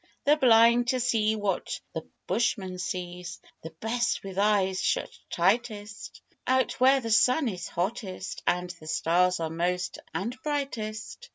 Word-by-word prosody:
They're 295 - +5
blind 240 -3 +5
to 235 -4 +1
what 205 -4 -2
the 160 - -3 0.2
bushman 190 -3 -1
sees 180 -1 -5 0.2
The 160 - -7
best 225 +9 -1
with 195 -1 -5
eyes 195 -2 +2
shut - - 0 0.2
tightest, 210 +3 -1 0.2
Out 260 -2 +1
where 265 +2 +6
the 230 -2 -4
sun 255 +6 +4
is 180 -5 -4
hottest 190 0 -4
and 180 0 +1
The 170 -3 -13
stars 180 +3 +2
are 160 -1 -2
most 180 +2 -2
and 230 +6 -3
brightest. 275 - -4
210 Hz, 140 wpm, -27 LUFS, 180-240 Hz, 0.2 s, where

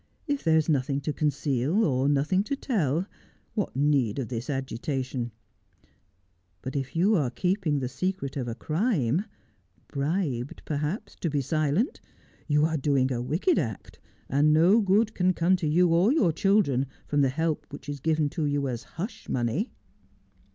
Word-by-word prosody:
' - - -40
If 275 - -11
there 160 -1 +4
is 155 - +1
nothing 140 -2 +1
to 150 +2 -2
conceal, 145 - +1
or 135 -1 +1
nothing 150 +7 +2
to 280 - -1
tell, 180 - 0 0.5
what 205 - -2
need 135 -6 +2
of 130 -4 -3
this 120 +2 -4
agitation? 130 -2 -3 1.3
But 130 - -5
if 135 +3 -3
you 190 +6 +3
are 145 -9 +1
keeping 180 - 0
the 130 -2 -1
secret 140 +1 -3
of 130 -4 -3
a 115 - -3
crime 165 - 0 0.3
— - - -38
bribed 140 -3 -2
perhaps 155 +8 -3
to 170 - -2
be 145 -1 0
silent 155 - 0 0.2
— - - -32
you 150 0 +3
are 160 0 0
doing 135 -2 +1
a 120 - -2
wicked 165 - +1
act, 110 - -5 0.3
and 145 +3 +3
no 170 +8 +5
good 210 +3 +2
can 185 0 +2
come 175 +3 +3
to 170 -4 -2
you 175 +4 +4
or 175 +7 +4
your 225 - +3
children 150 -10 +2 0.2
from 145 -1 +1
the 135 - +3
help 160 +3 -1
which - - -10
is 145 -1 -4
given 155 +1 +1
you 145 -3 0
as 120 -2 -3 0.2
hush 200 +8 -6
money.' 130 - -1
150 Hz, 170 wpm, -27 LUFS, 135-180 Hz, 1.3 s, no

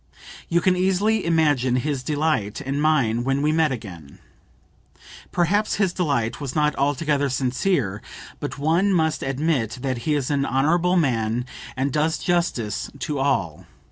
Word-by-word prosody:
You 170 +1 +2
can 185 +1 +3
easily 195 +4 +1
imagine 150 -7 +2
his 140 +1 -1
delight 145 -7 -1
and 140 0 -3
mine 130 -7 +2
when 135 +2 0
we 150 - +3
met 160 -1 +2
again. 90 - -8 1.1
Perhaps 200 +5 +1
his 195 -4 +1
delight 140 -9 -1
was 135 -2 -5
not 150 -1 +2
altogether 145 0 0
sincere, 130 - 0 0.4
but - - -5
one 165 +8 +2
must 160 -4 +1
admit 135 -3 -1
that 130 -3 -1
he 150 +6 0
is 140 -1 -1
an 140 -1 +1
honorable 165 +8 +2
man 120 -6 0 0.3
and 135 +1 -1
does 155 +2 +1
justice 170 - -1
to 140 +2 -3
all. 95 - -1
145 Hz, 145 wpm, -23 LUFS, 125-165 Hz, 1.1 s, can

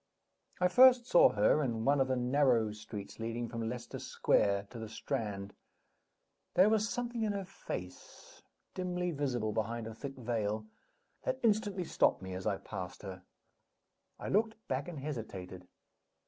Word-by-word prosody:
I 180 - +4
first 250 +4 +7
saw 175 - +7
her 105 +8 +3
in 115 -5 -1
one 140 0 +4
of 130 - +2
the 130 - +1
narrow 125 -3 +3
streets 105 -1 -8
leading 115 +1 -3
from 115 -1 -3
Leicester 125 0 -6
Square 100 0 +2
to 120 - -8
the 110 -1 -6
Strand. 105 -5 -3 1.0
There 185 +4 +7
was 215 -1 +2
something 240 -1 -3
in 215 -2 +1
her 200 -1 -3
face 90 - -8 0.3
(dimly 180 -1 -2
visible 130 -7 -1
behind 115 +2 -2
a 110 - -6
thick 135 +4 -7
veil) 110 -3 -2 0.6
that - - -1
instantly 205 -4 +2
stopped 95 - +2
me 95 0 -5
as 95 0 -4
I - - +1
passed 90 0 -7
her. 95 -2 -7 1.0
I - - -5
looked 220 +2 +2
back 130 +2 -2
and 175 -3 -6
hesitated. 95 -10 -6
125 Hz, 155 wpm, -33 LUFS, 110-180 Hz, 1.0 s, first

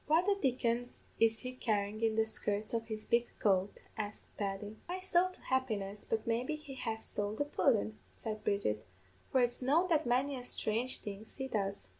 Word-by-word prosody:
"'What 320 +4 +5
the 405 - +5
dickens 245 -7 0 0.2
is 225 0 +4
he 255 0 -4
carryin' 215 -3 0
in 225 -1 +3
the 220 0 +4
skirts 210 -1 -1
of 225 -1 -1
his 215 -1 -4
big 235 0 +3
coat?' 195 -1 +2 0.2
asked 210 -1 -4
Paddy. 205 +1 -3
"'My 360 - -1
sowl 370 -1 +3
to 370 - -15
happiness, 210 -6 -1
but 220 -1 0
maybe 240 +6 0
he 300 -2 -9
has 225 -4 -3
stole 205 0 -2
the 290 - 0
pudden,' 225 -7 +2
said 215 -2 -5
Bridget, 110 - +1 0.5
'for 260 - +5
it's 245 +1 +1
known 315 +8 +3
that 315 -5 +3
many 260 +4 +2
a 250 - -6
sthrange 245 +1 0
thing 205 0 -6
he 265 -1 -2
does.' 200 -5 -2
230 Hz, 190 wpm, -34 LUFS, 210-260 Hz, 0.5 s, What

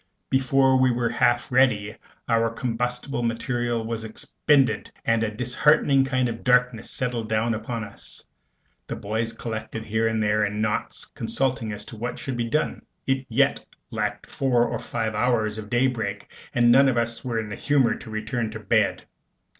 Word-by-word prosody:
Before 130 0 +4
we 130 0 +4
were 120 -1 0
half 120 +1 +1
ready, 115 -5 +3 0.3
our 115 0 +2
combustible 125 +3 -2
material 120 0 -1
was 115 0 -3
expended, 135 +4 +1
and 115 0 +2
a 110 - 0
disheartening 135 +4 +3
kind 130 -2 +1
of 115 -1 -5
darkness 125 -2 +2
settled 120 -3 -2
down 110 +1 +1
upon 115 +1 -4
us. 100 - -11 0.6
The - - -4
boys 110 +2 -2
collected 110 -1 -5
together - - -15
here 110 +1 +1
and 110 -1 0
there 105 0 +2
in 105 +1 -2
knots, 110 -1 -2
consulting 125 -4 -2
as 105 - -7
to 115 - -10
what 120 +2 -4
should 135 -5 -4
be 120 -1 -2
done. 155 +6 -1 0.2
It 135 -1 0
yet 140 +4 +2 0.3
lacked 105 -2 -2
four 125 -3 +1
or - - -3
five 110 -2 -3
hours 110 -1 +1
of 105 -1 -8
daybreak, 115 -5 -1 0.2
and 120 -1 +4
none 135 +3 +6
of 125 - 0
us 115 0 -1
were 120 -3 -1
in 110 -2 -4
the 105 - -5
humor 135 -2 +2
to - - -9
return 110 +2 -2
to 110 - -6
bed. 110 -1 +1
115 Hz, 175 wpm, -25 LUFS, 110-125 Hz, 0.6 s, none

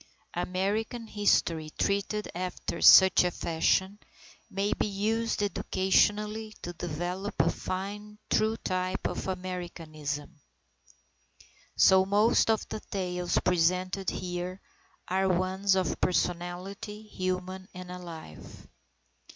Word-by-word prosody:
American 200 +7 -2
history 170 -7 +1
treated 200 +1 0
after 180 0 -4
such 190 -1 +8
a 180 - +2
fashion, 190 +4 0 0.5
may 200 +2 0
be - - -1
used 215 +2 0
educationally 210 +2 +1
to 175 - -5
develop 175 +4 -4
a - - +4
fine, 205 +3 -5
true 220 +1 +2
type 185 -1 -2
of - - -2
Americanism. 170 -5 -5 1.4
So 190 0 +6
most 205 +4 +3
of 220 -1 +1
the - - -4
tales 180 -3 -2
presented 185 +2 +1
here 180 +1 -4 0.5
are 190 +1 +1
ones 190 +2 +2
of 185 -3 -1
personality, 180 +4 -2
human 185 -2 -4
and 180 0 -8
alive. 170 - -10
185 Hz, 100 wpm, -29 LUFS, 180-205 Hz, 1.4 s, such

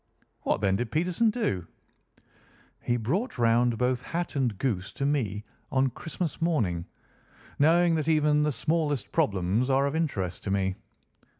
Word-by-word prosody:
"What, - - 0
then, 95 -2 +2
did 120 0 -2
Peterson 180 - +2
do?" 100 - -1 1.1
"He 120 - 0
brought 170 - -2
round 120 0 +3
both 125 +1 +1
hat 170 +5 -4
and 125 -7 0
goose 95 -5 -2
to 140 - -2
me 110 -8 0 0.3
on 130 0 +2
Christmas 160 +4 -5
morning, 105 - 0 0.7
knowing 170 +3 +5
that 155 -2 -1
even 150 -2 +3
the 150 0 +2
smallest 145 -1 -1
problems 100 +6 +1
are 135 +1 +3
of 140 +2 -1
interest 105 - -2
to - - -2
me. 95 -1 +1
130 Hz, 145 wpm, -27 LUFS, 105-155 Hz, 1.1 s, knowing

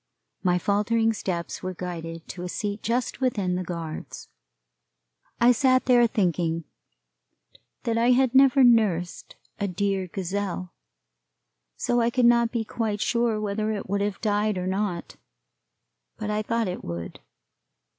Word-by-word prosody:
My 180 -2 +2
faltering 215 +4 +1
steps 175 -5 -4
were 185 0 -4
guided 165 -2 -6
to 180 - -7
a 180 - -4
seat 205 +3 -3
just 240 +3 -1
within 205 -8 0
the 180 +1 -1
guards. 165 -3 -7 1.1
I 240 +1 +6
sat 255 +1 +3
there 245 -2 +5
thinking 170 -5 0 1.2
that 230 -1 0
I 235 +1 +3
had 255 0 +4
never 270 0 +6
nursed 210 -8 +2 0.2
a 200 - 0
dear 195 0 -1
gazelle, 185 0 -4 1.0
so 240 0 +1
I 230 - +3
could 245 0 +2
not 235 -1 +4
be 230 -2 -2
quite 215 -2 -2
sure 235 0 +1
whether 215 +1 -1
it 210 -2 -4
would 200 +1 -1
have 205 -1 -2
died 210 -1 +1
or 180 - -2
not, 190 -2 -2 1.0
but 215 -1 -3
I 210 0 0
thought 230 0 -1
it 180 - -5
would. 85 0 -6
205 Hz, 145 wpm, -25 LUFS, 180-230 Hz, 1.2 s, I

